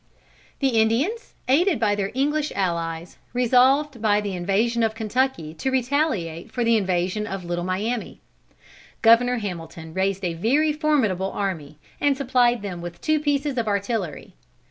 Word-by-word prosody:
The 270 - +3
Indians, 290 - -1
aided 325 - +3
by 210 -2 +2
their 200 -1 -1
English 295 +3 0
allies, 170 -2 -3
resolved 255 +2 +3
by 210 -2 +3
the 205 -2 -3
invasion 200 +6 0
of 220 -1 +1
Kentucky 225 -7 -1
to 165 +11 -2
retaliate 250 - -1
for 245 - -1
the 230 0 +3
invasion 190 +1 0
of 195 -2 -5
the - - -10
Little 175 0 -1
Miami. 210 +6 -3 0.8
Governor 245 +2 +5
Hamilton 165 -5 -6
raised 195 +1 -1
a 170 - -1
very 275 - +2
formidable 260 - +1
army, 165 -7 -4 0.2
and 285 -2 +2
supplied 245 -4 +2
them 180 -4 -5
with 175 0 -8
two 310 0 +1
pieces 290 -2 0
of 225 - -2
artillery. 200 - -2
220 Hz, 150 wpm, -23 LUFS, 185-265 Hz, 0.8 s, Governor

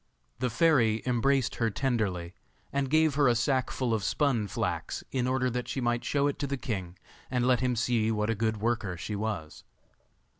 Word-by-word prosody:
The 125 0 0
fairy 120 -5 +3
embraced 130 +1 +1
her 115 -1 +1
tenderly, 100 -8 -1 0.4
and 140 -1 0
gave 155 0 +4
her 145 0 +3
a 120 - +4
sack 130 +1 +1
full 125 -3 -1
of 110 -3 0
spun 120 -2 +1
flax, - - -3
in 125 -2 0
order 130 0 +1
that 125 +1 -3
she - - -3
might 120 -1 0
show 140 +1 +1
it 145 - -1
to 140 - -1
the 140 0 -2
king, 95 -8 -4 0.3
and 125 -1 0
let 125 -2 +4
him 125 -1 +1
see 115 -2 +1
what 105 0 0
a - - +2
good 110 0 -1
worker 110 -4 -1
she 105 +5 -4
was. 100 -7 -4
120 Hz, 195 wpm, -29 LUFS, 110-130 Hz, 0.4 s, gave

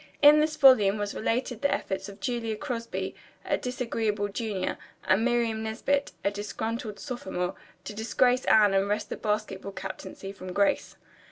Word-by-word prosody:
In 295 +1 +9
this 305 0 +1
volume 215 -8 +6
was 205 -1 -2
related 245 +1 -1
the 280 - +2
efforts 190 +1 -2
of 200 +1 -12
Julia 235 -2 -2
Crosby, 230 -1 -4 0.3
a - - +2
disagreeable 225 -5 -2
junior, 200 -3 -3 0.2
and 190 +4 +3
Miriam 235 -2 +1
Nesbit, 275 +6 0
a 200 - +3
disgruntled 210 +1 -4
sophomore, 190 -9 -3 0.3
to - - -6
disgrace 245 +4 +2
Anne 210 -2 +6
and 195 +1 +2
wrest 210 +1 -1
the - - -3
basketball 210 -2 -2
captaincy 195 0 -7
from 185 -2 -8
Grace. 200 +1 +1
220 Hz, 155 wpm, -28 LUFS, 200-245 Hz, 0.3 s, In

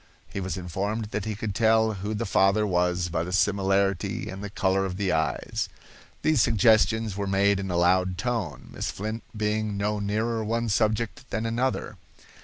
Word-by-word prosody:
He - - -5
was 95 -2 -3
informed 100 +5 -3
that 105 - -2
he 110 -1 -2
could 105 0 -4
tell 110 0 +3
who 105 +2 -4
the 115 +2 -2
father 100 +1 +3
was 90 -2 +1
by 80 -1 -1
the 90 - -5
similarity 100 +2 +1
and 95 +1 -7
the 105 - -4
color 95 -1 +1
of 95 -1 -3
the 100 -2 0
eyes. 90 - -1 0.5
These 155 -6 +4
suggestions 110 -1 +3
were 100 0 -2
made 100 +1 +3
in 95 -1 -4
a 90 - 0
loud 90 +1 +3
tone, 95 - -3
Miss - - -3
Flint 110 +3 -4 0.2
being 105 -1 -1
no 105 +1 0
nearer 110 +3 -1
one 115 +2 -1
subject 110 +4 0
than 110 0 -2
another. 115 -2 -1
100 Hz, 180 wpm, -26 LUFS, 95-110 Hz, 0.5 s, These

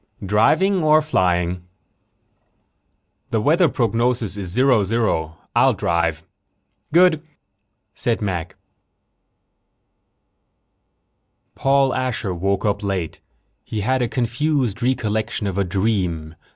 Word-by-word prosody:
"Driving 175 - +3
or 155 0 +5
flying?" 90 - 0 1.7
"The 110 - 0
weather 160 - +3
prognosis 115 -3 0
is 100 -3 -5
zero 125 +3 +3
zero. 95 -7 -1 0.2
I'll - - +4
drive." 85 -1 -1 0.7
"Good," 170 -1 +4 0.7
said 115 +4 -1
Mac. 90 -3 -3 3.0
Paul 135 -1 +2
Asher 125 -7 -2
woke 95 +3 -1
up 105 -1 0
late. 95 -5 -3 0.4
He 110 - -4
had 130 +5 0
a 120 - +1
confused 125 -1 -1
recollection 110 -3 -1
of 100 -1 -2
a - - +3
dream. 90 -5 -1
110 Hz, 100 wpm, -21 LUFS, 95-130 Hz, 3.0 s, or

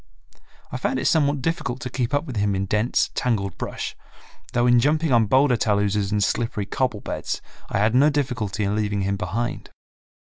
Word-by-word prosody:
I - - -3
found - - -1
it - - -2
somewhat 145 -3 +2
difficult 155 -6 -2
to 125 - -4
keep 125 -2 -1
up 145 +2 0
with 130 -6 -7
him 100 -1 +1
in 95 0 -1
dense, 105 +5 +1
tangled 100 -7 -1
brush, - - -4 0.6
though 120 0 +2
in 120 -1 +5
jumping 150 +4 +2
on 115 -3 +4
boulder 130 +3 +4
taluses 105 -2 +1
and 105 -1 +2
slippery 110 0 -1
cobble 120 +1 -1
beds - - -4 0.3
I - - -1
had 110 +3 +2
no 140 +4 +5
difficulty 125 -8 -1
in 100 +1 0
leaving 105 -1 -1
him 100 +1 0
behind. 110 +6 -3
115 Hz, 185 wpm, -23 LUFS, 105-130 Hz, 0.6 s, in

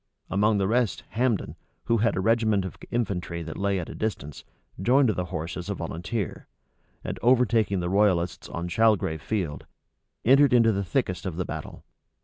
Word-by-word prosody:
Among 105 +3 +3
the 95 -1 +1
rest 120 0 +1
Hambden, 120 -3 0 0.3
who 115 - +2
had 115 +2 +2
a 95 - 0
regiment 110 -2 +2
of 95 - -6
infantry 90 -7 -2
that 80 0 -7
lay 100 0 0
at 85 - -5
a - - -7
distance, 90 -10 -4 0.4
joined 130 +5 +4
the 90 -4 -1
horse 80 0 -5
as 90 +2 -6
a 100 - -1
volunteer; 85 +5 -4 0.6
and - - -5
overtaking 115 -6 +3
the 85 - -2
royalists 95 -4 +1
on 85 +1 -4
Chalgrave 100 -5 +2
field, 90 -9 -3 0.6
entered 135 +2 +6
into 115 -2 +5
the 100 -1 -1
thickest 95 -2 -1
of 90 - -4
the 90 - -1
battle. - - -7
100 Hz, 170 wpm, -26 LUFS, 90-115 Hz, 0.6 s, entered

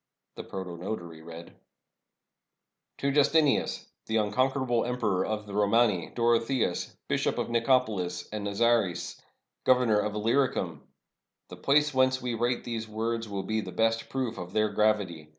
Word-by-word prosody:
The - - -8
protonotary 85 -3 -6
read: 85 +1 -10 0.7
— - - -58
"To 140 - +1
Justinianus, 145 +1 +2 0.2
the 110 - +1
unconquerable 125 +3 +1
Emperor 115 -7 0
of 105 +1 -3
the 100 - -9
Romani, 105 -4 +2
Dorotheos, 115 -3 +1
Bishop - - 0
of - - -2
NicopoHs, 115 -6 +1
and 105 -1 -4
Nazares, 100 -4 0 0.4
Governor 125 -5 +4
of 105 0 -2
Illyricum. 105 - 0 0.7
The - - -9
place 150 +1 +2
whence 130 0 +3
we 125 -1 -3
write 120 +2 0
these 115 -2 -4
words 115 +1 -2
will 100 -1 -3
be 110 +3 -1
the - - -7
best 115 0 0
proof 130 -4 -3
of 90 +1 -7
their 110 0 +2
gravity. 100 -7 0
110 Hz, 140 wpm, -28 LUFS, 100-125 Hz, 0.7 s, Governor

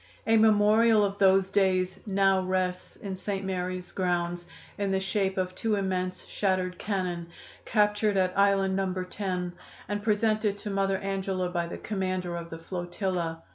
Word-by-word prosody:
A 225 - +4
memorial 215 0 +5
of 200 0 -4
those 190 -1 +4
days 190 -2 +2
now 195 -1 +3
rests 185 -1 -2
in 195 -2 -6
St. 195 0 -4
Mary's 185 -1 -3
grounds, 175 -1 -1 0.3
in 200 -1 0
the 190 0 +1
shape 195 0 -1
of 185 -1 -1
two 215 +3 0
immense 185 -2 -2
shattered 185 -2 -1
cannon, 180 -4 -2 0.4
captured 210 -1 +2
at 185 -1 +1
Island 195 -1 +3
No. 190 -1 0
10, 180 -2 -3 0.3
and 205 +2 -2
presented 215 -1 +1
to 205 0 -5
Mother 195 0 +1
Angela 190 -2 -2
by 175 -1 -1
the - - -6
commander 185 -3 -2
of 170 -1 -6
the 165 - -7
flotilla. 175 -1 -3
190 Hz, 155 wpm, -28 LUFS, 180-200 Hz, 0.4 s, memorial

